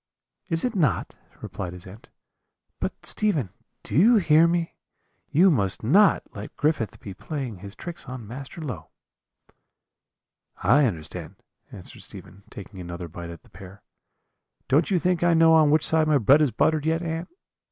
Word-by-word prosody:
"'Is 165 +2 0
it 250 - -1
not?' 150 - -1 0.2
replied 90 -2 -6
his 90 -1 -11
aunt; 100 +4 -14 0.7
'but, - - -5
Stephen, 155 - 0 0.3
do - - -6
you 215 - +6
hear 165 -5 +5
me? 170 0 -1 0.6
you 180 +5 +4
must 100 - 0
not 190 - +4
let 105 0 -9
Griffith 145 -7 -1
be 100 - -9
playing 130 - -6
his 100 +1 -9
tricks 170 -5 -8
on 125 -3 -7
Master 135 +8 -9
Low.' 100 - -7 1.7
"'I 145 +3 +4
understand,' 85 -1 -6 0.4
answered - - -11
Stephen, 100 - -12
taking 100 -1 -11
another 85 0 -7
bite 85 +1 -9
at 85 - -11
the - - -22
pear. 95 +1 -13 0.8
'Don't 150 +5 +2
you 190 - +2
think 180 0 0
I 175 -1 +3
know 165 0 +5
on 155 -2 +5
which 155 +1 +3
side 160 -1 +2
my 150 -1 +4
bread 135 +5 +5
is 150 - +3
buttered 155 +7 0
yet, 165 +1 0
aunt?' 165 0 -4
140 Hz, 165 wpm, -24 LUFS, 100-165 Hz, 1.7 s, you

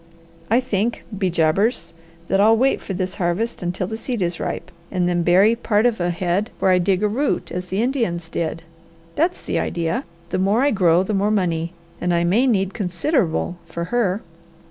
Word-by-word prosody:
I 230 +3 +4
think, 235 -2 -1
be 190 -2 0
jabbers, 175 +7 +1 0.3
that 195 - +1
I'll 220 +2 +5
wait 265 +3 +2
for 195 - -5
this 185 0 -2
harvest 190 +8 -1
until 180 +1 -2
the 220 +4 -5
seed 230 -3 -2
is 170 -1 -2
ripe, 180 - -4 0.2
and 180 -2 0
then 175 -1 +1
bury 190 +6 +5
part 225 -2 +1
of 235 -4 +2
a 175 0 0
head 180 +5 -1
where 190 - +2
I 180 - +4
dig 190 +2 +1
a - - +4
root, 265 +7 -1
as 180 0 -4
the 190 +5 0
Indians 230 -11 -1
did. 165 0 -3 0.5
That's 345 +4 0
the - - -1
idea! 165 -1 -1 0.3
The - - -1
more 200 +7 +2
I 285 - +3
grow, 180 -3 +4
the 210 - -3
more 200 +1 +2
money; 170 -5 0 0.3
and 180 -1 +1
I 170 - +2
may 210 +10 +3
need 195 -5 +1
considerable 180 - 0
for 170 +1 -4
her. 210 -4 +1
190 Hz, 195 wpm, -21 LUFS, 175-225 Hz, 0.5 s, I'll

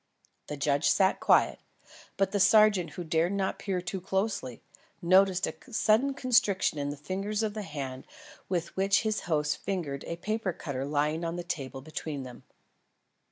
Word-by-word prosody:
The 150 - -5
judge 140 +1 +2
sat 190 +3 +3
quiet, - - +3 0.6
but 195 -1 +1
the 205 - 0
sergeant 210 -3 +5
who 175 - -5
dared 165 +3 +1
not 195 -1 -1
peer 190 -3 -2
too 180 +2 -5
closely, 190 - -2 0.4
noticed 185 +1 +4
a - - -4 0.2
sudden 225 +5 +2
constriction 215 - +2
in 145 0 -2
the 145 - -5
fingers 195 +7 -3
of 215 -1 -1
the 215 - -4
hand 140 -7 -6 0.4
with 175 -2 -2
which 195 +1 +3
his 215 -1 0
host 150 -2 +1
fingered 165 -8 -3
a 170 - -4
paper 205 +1 -2
cutter 135 -4 -4
lying 150 +3 0
on 165 0 -2
the 175 - -4
table 135 -6 -5
between 155 -2 -5
them. 125 -1 -10
175 Hz, 165 wpm, -29 LUFS, 150-195 Hz, 0.6 s, sergeant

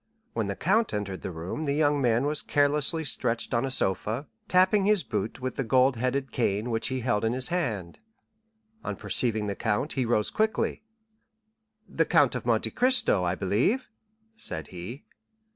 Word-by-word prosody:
When 110 -3 -1
the 100 - -3
count 200 - +1
entered 100 -2 -4
the - - -4
room 90 - -5
the 140 -1 0
young 145 -1 +2
man 120 +1 +2
was 150 +1 -1
carelessly 145 +3 +1
stretched 120 -5 -2
on 120 +2 +1
a - - -2
sofa, 110 - 0 0.2
tapping 185 +2 +4
his 210 -3 +3
boot 110 - -3
with 130 -1 -4
the 135 - 0
gold 130 +2 +3
headed 130 +2 -1
cane 110 0 -1
which 115 0 0
he 130 -1 -2
held 110 -3 0
in 115 +1 +1
his 130 +4 -1
hand. 110 - -2 0.8
On - - -3
perceiving 110 -4 +1
the 100 - -2
count 110 +7 -1
he 130 -2 0
rose 110 -3 +1
quickly. 220 0 0 1.1
"The - - 0
Count - - +4
of - - -5
Monte - - +1
Cristo, 250 - +3
I 90 +1 0
believe?" 120 - 0 0.4
said 80 - -6
he. 95 - -8
125 Hz, 175 wpm, -27 LUFS, 105-150 Hz, 1.1 s, tapping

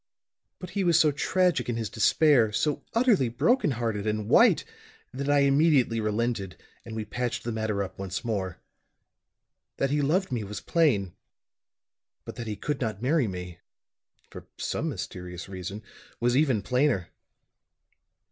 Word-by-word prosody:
But 180 - -9
he 200 - -1
was 170 -2 +4
so 155 -2 +5
tragic 175 -2 +1
in 120 - -1
his 115 -1 -2
despair 120 +1 +3
so 145 +7 0
utterly 230 - +3
broken 230 - +2
hearted 115 -5 -2
and 105 -1 -1
white - - +5 0.5
that 140 +2 -3
I 145 -1 +4
immediately 140 -5 +3
relented 110 -3 -2 0.3
and 115 - -8
we 110 -1 -3
patched 120 +3 -3
the 120 - -3
matter 110 -2 -1
up 95 - -9
once 95 +4 -4
more. 95 -6 -2 1.2
That 135 - 0
he 145 0 +1
loved 170 +5 +1
me 120 -4 -1
was 105 +1 -6
plain; 115 - +1 1.1
but - - -8
that 115 -2 -5
he 105 - -3
could 145 +6 -3
not 110 -2 -3
marry 140 -1 +2
me 90 -3 -7 0.7
for - - -11
some - - -2
mysterious 90 -1 -6
reason 95 +2 -7 0.4
was 120 +1 +2
even 130 -8 +2
plainer. 125 -8 +1
120 Hz, 150 wpm, -27 LUFS, 105-145 Hz, 1.2 s, so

